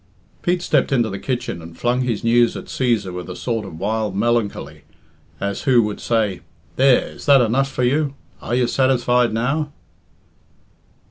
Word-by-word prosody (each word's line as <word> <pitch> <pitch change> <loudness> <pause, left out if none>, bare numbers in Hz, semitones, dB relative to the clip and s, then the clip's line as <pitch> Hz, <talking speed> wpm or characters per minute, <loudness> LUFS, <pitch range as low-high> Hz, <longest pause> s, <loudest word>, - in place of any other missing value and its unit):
Pete 175 0 0
stepped 145 -5 +1
into 120 -5 +1
the 100 - -5
kitchen 125 -9 -3
and 85 0 -12
flung 125 +1 0
his 120 -5 -2
news 120 0 +3
at - - -8
Cæsar 115 -8 -1
with 90 0 -6
a 90 - -6
sort 115 -4 -3
of 80 - -9
wild 105 +1 -2
melancholy, 115 0 -1 0.6
as 100 0 -3
who 125 -3 +5
would 105 -1 -4
say, 110 -5 0 0.3
"There, 135 -1 +4
is - - -12
that 140 -1 +7
enough 130 +4 +1
for 125 - -2
you? 140 +2 +1 0.3
Are 120 - -2
you 125 0 +2
satisfied 125 -2 +2
now?" 135 +7 -1
120 Hz, 165 wpm, -20 LUFS, 105-130 Hz, 0.6 s, that